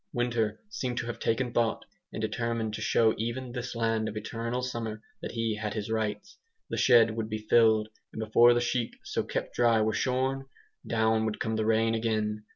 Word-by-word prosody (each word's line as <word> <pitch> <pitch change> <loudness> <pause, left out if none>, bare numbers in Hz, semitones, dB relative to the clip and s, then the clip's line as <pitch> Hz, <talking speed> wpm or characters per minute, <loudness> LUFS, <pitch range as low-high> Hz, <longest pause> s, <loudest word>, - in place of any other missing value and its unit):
Winter 120 -3 0
seemed 130 - -4
to 120 - -1
have 120 - -5
taken 120 +1 0
thought, 115 -2 0 0.3
and - - -6
determined 115 0 -2
to - - -5
show 110 -1 +3
even 120 +3 -3
this 125 0 -5
land 115 -1 0
of 105 - -6
eternal 115 +3 -3
summer 115 -3 -4 0.2
that - - -5
he 115 -2 -1
had 105 -1 -3
his 105 0 -3
rights. 105 -2 -3 0.3
The - - -2
shed 115 -2 +6
would 110 -1 -3
be 110 0 -5
filled, 110 -2 +5 0.2
and - - -8
before 115 +2 +5
the 120 - +2
sheep 120 -1 -1
so - - -1
kept - - -4
dry 115 -2 +3
were 110 0 +1
shorn, 130 +3 0 0.4
down 110 -1 +2
would 110 -1 -2
come 110 -3 -1
the 110 0 0
rain 115 0 +3
again. 110 -2 -1
115 Hz, 195 wpm, -29 LUFS, 110-120 Hz, 0.4 s, shed